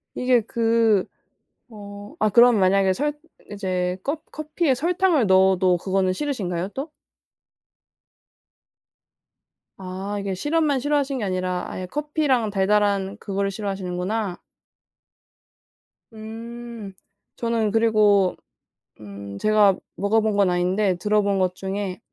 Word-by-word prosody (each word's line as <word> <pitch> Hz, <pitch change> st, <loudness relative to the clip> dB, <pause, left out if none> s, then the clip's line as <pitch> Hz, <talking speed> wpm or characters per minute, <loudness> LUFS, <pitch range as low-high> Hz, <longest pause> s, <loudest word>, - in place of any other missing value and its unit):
이게 250 Hz, -1 st, +2 dB
그 225 Hz, -2 st, +1 dB, 0.6 s
어 205 Hz, -1 st, -11 dB
아 215 Hz, -, +3 dB
그럼 235 Hz, 0 st, +6 dB
만약에 190 Hz, 0 st, +3 dB
설 295 Hz, +8 st, -1 dB, 0.4 s
이제 185 Hz, -3 st, -2 dB
껍 310 Hz, +3 st, -3 dB
커피에 305 Hz, -1 st, -1 dB
설탕을 340 Hz, -1 st, +2 dB
넣어도 190 Hz, -1 st, +4 dB
그거는 190 Hz, +1 st, 0 dB
싫으신가요 190 Hz, -, -3 dB
또? 285 Hz, +4 st, -5 dB, 2.9 s
아. 190 Hz, +2 st, -5 dB
이게 195 Hz, -1 st, -3 dB
시럽만 295 Hz, -, +1 dB
싫어하시는 285 Hz, -1 st, 0 dB
게 215 Hz, -, -2 dB
아니라 185 Hz, -1 st, -2 dB
아예 185 Hz, -, -5 dB
커피랑 290 Hz, -, 0 dB
달달한 200 Hz, 0 st, +1 dB
그거를 200 Hz, -1 st, -2 dB
싫어하시는구나. 195 Hz, 0 st, -3 dB, 1.7 s
음. 225 Hz, -1 st, -9 dB, 0.4 s
저는 230 Hz, -2 st, -1 dB
그리고 210 Hz, -4 st, +3 dB, 0.6 s
음 100 Hz, -1 st, -9 dB
제가 210 Hz, -, +4 dB, 0.2 s
먹어본 215 Hz, +2 st, +1 dB
건 200 Hz, -2 st, +3 dB
아닌데 180 Hz, +2 st, +1 dB
들어본 200 Hz, +1 st, +1 dB
것 185 Hz, -1 st, 0 dB
중에 190 Hz, 0 st, -4 dB
205 Hz, 235 characters per minute, -23 LUFS, 190-235 Hz, 2.9 s, 그럼